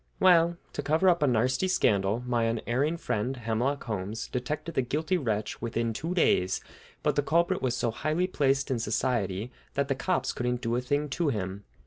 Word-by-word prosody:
Well, 170 -2 +5 0.2
to - - -2
cover 160 +6 +3
up 175 -2 +3
a 145 - +4
"narsty" 130 +8 +2
scandal, 105 - +2
my 120 -2 +1
unerring 120 +8 0
friend, 125 -2 -2
Hemlock 120 +5 -1
Holmes, 105 -1 -4
detected 150 +6 -3
the 130 - +2
guilty 155 +8 -1
wretch 110 - -2
within 115 0 -1
two 165 +10 -3
days, 95 - +3 0.4
but 150 -2 +2
the 145 - +3
culprit 170 +5 +1
was 125 -2 0
so 120 -1 0
highly 155 +9 0
placed 140 -6 +1
in 125 - 0
society 115 -2 -1 0.2
that 140 0 0
the - - +3
cops 175 +8 -1
couldn't 125 0 -1
do 115 -1 0
a 125 - 0
thing 145 +4 0
to 160 +3 0
him. 100 -4 -3
125 Hz, 185 wpm, -28 LUFS, 115-155 Hz, 0.4 s, Well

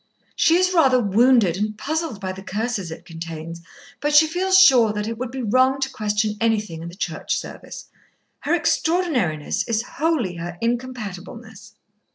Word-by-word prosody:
She 325 - +4
is 370 +1 +2
rather 265 -7 +4
wounded 220 -3 +3
and 210 +1 -3
puzzled 315 -4 -3
by 190 -2 -4
the 190 +1 -9
curses 205 -2 -3
it 160 - -9
contains, 165 0 -8 0.4
but 295 0 0
she 310 +2 +8
feels 370 +4 +2
sure 255 - +6
that 210 0 -3
it 230 - -3
would 255 -1 -3
be 260 +1 -5
wrong 255 +5 +2
to 265 0 -2
question 210 -1 -1
anything 215 -8 0
in 170 - -7
the 175 - -12
Church 195 - -3
Service. - - -9 0.5
Her - - 0
extraordinariness 280 - 0
is 230 -1 0
wholly 265 - -1
her 175 +1 -6
incompatibleness." 225 -2 -5
225 Hz, 165 wpm, -22 LUFS, 195-265 Hz, 0.5 s, she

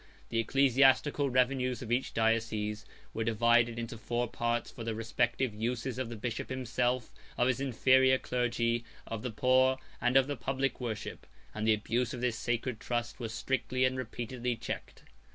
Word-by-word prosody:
The 115 - 0
ecclesiastical 135 +3 +4
revenues 130 0 +1
of 120 - -7
each 125 +2 0
diocese 110 -1 0 0.3
were 115 - -1
divided 115 +1 +3
into 115 -1 -5
four 120 +2 -1
parts 120 +1 -1
for 115 - -8
the 115 -1 -2
respective 120 +2 0
uses 120 +3 -2
of 130 -3 -2
the 120 - -5
bishop 115 +1 -4
himself, 125 -1 -1 0.2
of 120 - +3
his 130 +1 +1
inferior 130 0 +4
clergy, 120 -2 0 0.2
of 115 -2 -5
the 125 - -3
poor, 130 +4 +3 0.2
and 125 +2 +4
of 135 - +5
the 145 +1 -3
public 135 +2 -2
worship; 110 -4 -5 0.3
and 110 0 -2
the 110 - +6
abuse 115 +4 -1
of 120 - -7
this 120 -3 0
sacred 120 -1 -2
trust 120 +1 -3
was 115 -3 -4
strictly 130 +2 0
and 130 0 +1
repeatedly 120 0 -3
checked. 115 - -6
120 Hz, 170 wpm, -31 LUFS, 115-130 Hz, 0.3 s, the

